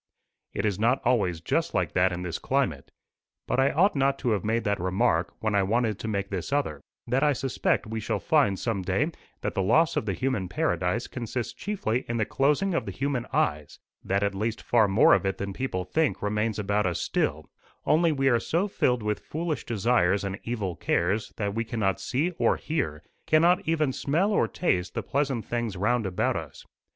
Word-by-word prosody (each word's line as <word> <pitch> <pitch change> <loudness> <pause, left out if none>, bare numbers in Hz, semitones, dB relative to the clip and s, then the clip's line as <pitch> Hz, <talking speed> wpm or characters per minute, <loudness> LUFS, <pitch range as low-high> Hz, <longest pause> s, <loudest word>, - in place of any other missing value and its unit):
"It 100 - -1
is 100 -2 0
not 120 +4 +3
always 100 -9 +1
just 85 - -1
like - - +1
that 95 +1 +3
in 90 0 -4
this 85 -2 -4
climate. - - -1 0.6
But - - 0
I 135 +1 +4
ought 185 +5 +3
not 135 0 +2
to 120 - +3
have 105 -4 0
made 115 +2 0
that 100 -1 0
remark 95 +2 +1
when 110 -1 0
I 100 - +4
wanted 110 +1 0
to - - -5
make 100 -2 -2
this 95 +2 -4
other: 80 - -1 0.2
that 125 +3 +1
I 150 -1 +4
suspect 130 -1 0
we 110 0 -4
shall 105 - -1
find 100 -1 +2
some 110 -3 -2
day 90 - 0 0.3
that - - -2
the 95 - 0
loss 145 - +3
of 110 - -1
the 100 - 0
human 115 -5 -1
paradise 90 +5 0
consists 120 -1 -4
chiefly 130 - -2
in 115 - -1
the 110 - +1
closing 150 - +1
of 165 - -1
the - - -3
human 135 -3 -2
eyes; 75 -1 -1 0.3
that 100 +1 0
at 100 0 0
least 110 +3 -3
far 115 -3 +4
more 95 +2 +5
of - - +3
it 95 0 -1
than 100 0 -4
people 95 -6 -3
think 160 - 0
remains 105 +1 0
about 105 -1 0
us 85 - -1
still, 75 +1 -1 0.4
only 165 +2 +4
we 135 -2 +1
are 120 -3 +4
so 170 - 0
filled 125 - 0
with 105 0 -1
foolish 160 -3 -4
desires 105 -4 +2
and 100 0 -4
evil 105 -7 -3
cares, 95 +7 0
that 100 -2 -2
we 115 +2 -1
cannot 105 -5 -1
see 140 - 0
or - - +3
hear, 85 - -3 0.2
cannot 170 +3 +4
even 155 -4 +1
smell 170 +12 +1
or 205 - +2
taste 90 - -1
the - - -2
pleasant 135 -5 -1
things 120 -5 -3
round 105 +3 +1
about 95 - 0
us. - - -7
110 Hz, 205 wpm, -27 LUFS, 95-135 Hz, 0.6 s, more